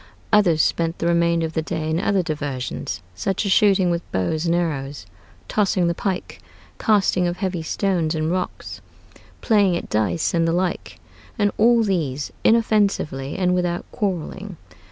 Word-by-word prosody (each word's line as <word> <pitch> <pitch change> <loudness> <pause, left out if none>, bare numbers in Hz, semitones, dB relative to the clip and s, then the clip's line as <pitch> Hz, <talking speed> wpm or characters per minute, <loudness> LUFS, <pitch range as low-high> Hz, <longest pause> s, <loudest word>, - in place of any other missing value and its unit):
Others 175 -7 +4
spent 165 0 0
the - - -3
remainder 170 -1 +2
of 160 - -5
the 160 - 0
day 160 -1 -3
in 160 +1 0
other 195 -1 +1
diversions, 145 - -4
such 195 - -2
as 200 - 0
shooting 190 -3 +4
with 170 0 -1
bows 155 - -1
and 170 - +2
arrows, 145 - -3 0.4
tossing 200 -3 +1
the 170 - +1
pike, 185 +1 -4 0.4
casting 195 -4 +2
of 175 0 -3
heavy 185 -4 -2
stones 170 -1 0
and 155 +1 -1
rocks, 185 0 -4 0.6
playing 200 -6 +3
at - - -7
dice 110 +9 0
and 165 -1 +2
the 165 - +1
like, 180 0 -2 0.4
and 205 -2 +2
all 230 +1 +5
these 150 -9 -1
inoffensively 200 -11 +1
and 180 -1 +2
without 175 -1 -1
quarreling. 190 -1 -4
175 Hz, 155 wpm, -22 LUFS, 160-195 Hz, 0.6 s, all